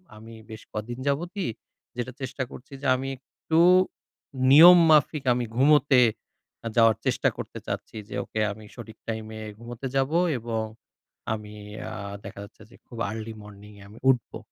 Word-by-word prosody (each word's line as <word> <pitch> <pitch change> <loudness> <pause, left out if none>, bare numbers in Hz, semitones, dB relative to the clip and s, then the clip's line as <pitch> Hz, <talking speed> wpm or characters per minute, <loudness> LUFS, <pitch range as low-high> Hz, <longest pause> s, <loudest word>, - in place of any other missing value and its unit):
আমি 115 +1 -12 0.2
বেশ 110 +1 -9
কদিন 115 +3 -5
যাবতই 175 +7 -1 0.5
যেটা 125 +1 -4
চেষ্টা 130 0 -3
করছি 135 +2 -12
যে - - -7
আমি 135 +1 -4
একটু 160 +4 -2 0.9
নিয়ম 175 +5 +10
মাফিক 150 -1 +4
আমি 120 0 -1
ঘুমোতে 140 -1 +5 0.6
আ - - -1
যাওয়ার 115 -2 +5
চেষ্টা - - +2
করতে - - -7
চাচ্ছি। - - -5
যে - - -6
ওকে 110 - -5
আমি 105 +1 -10
সঠিক 115 -2 -10
টাইমে 110 -1 -5 0.2
ঘুমোতে 120 +3 -7
যাবো 135 +5 +2 0.2
এবং 115 -1 -3 0.7
আমি 105 -1 -7 0.4
আ - - -6 0.3
দেখা 100 0 -9
যাচ্ছে 110 +1 -15
যে - - -17
খুব 120 - -11
আর্লি 110 0 -6
মর্নিংয়ে 105 0 -13
আমি 110 - -14
উঠবো। 125 -4 +1
120 Hz, 155 wpm, -26 LUFS, 110-135 Hz, 0.9 s, নিয়ম